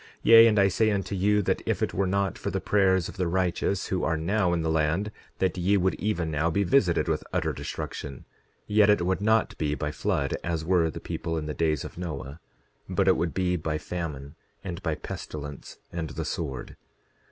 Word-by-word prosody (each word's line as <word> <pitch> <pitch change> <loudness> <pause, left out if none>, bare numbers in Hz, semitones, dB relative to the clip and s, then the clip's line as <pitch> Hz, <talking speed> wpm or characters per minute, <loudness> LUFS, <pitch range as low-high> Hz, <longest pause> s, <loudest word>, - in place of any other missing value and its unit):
10:22 - - -20 0.2
Yea, 115 0 +9
and 110 -2 +2
I 100 - +6
say 110 +4 +2
unto 100 -1 -1
you 105 +2 +2
that - - 0
if - - 0
it - - -1
were 95 0 +1
not 100 -1 0
for - - -4
the - - -1
prayers 95 -3 +2
of - - -10
the 90 -2 0
righteous, 90 +2 0
who 95 - -1
are 80 0 +1
now 90 +3 +1
in 85 -2 0
the 80 - 0
land, 80 +7 +1 0.3
that 95 -1 0
ye 100 +3 +3
would 95 0 +2
even 90 -6 -1
now 75 +2 +1
be 100 +5 +1
visited 90 -5 +2
with - - 0
utter - - 0
destruction; 70 -3 -6 0.4
yet 105 0 +4
it 105 -4 +3
would 95 +1 0
not 110 +2 +2
be 75 -1 0
by 75 0 -3
flood, 75 - -1
as 85 -2 -2
were 85 -2 +3
the - - -7
people 80 -1 -4
in 75 - -3
the 75 - -3
days 80 -3 0
of - - -9
Noah, 75 -4 -6 0.5
but 95 +1 +1
it 95 - +6
would 85 -1 -2
be 90 -1 +1
by 80 -2 -2
famine, 75 -5 -5 0.3
and 90 -1 -5
by 80 -4 -1
pestilence, 75 -2 -7
and 85 -2 -4
the 80 +2 -5
sword. 70 -7 -4
90 Hz, 215 wpm, -27 LUFS, 80-100 Hz, 0.5 s, Yea